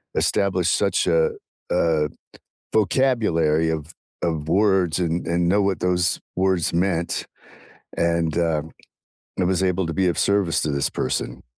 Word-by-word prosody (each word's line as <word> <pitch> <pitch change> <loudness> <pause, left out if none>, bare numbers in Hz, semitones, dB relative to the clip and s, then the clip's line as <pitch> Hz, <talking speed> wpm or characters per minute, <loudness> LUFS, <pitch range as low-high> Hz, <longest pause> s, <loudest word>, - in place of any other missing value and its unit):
establish - - +1
such - - +1
a 480 -1 +3 0.4
a 80 -3 +2 0.6
vocabulary 100 - +2
of 80 0 -5 0.3
of 80 -3 -2
words 95 -3 +2
and 85 -1 -1
and 85 +1 +1
know 100 +3 +3
what 95 -1 0
those 90 -1 +1 0.2
words 95 -2 +1
meant 85 -1 -1 0.7
and, 85 -1 0
uh, 80 -3 +1 0.8
it - - +2
was 95 0 +1
able 90 0 +1
to 80 - -3
be 95 +2 +1
of 85 - 0
service 100 -4 +2
to 75 - -1
this 70 0 0
person. 65 - -3
85 Hz, 140 wpm, -22 LUFS, 80-95 Hz, 0.8 s, a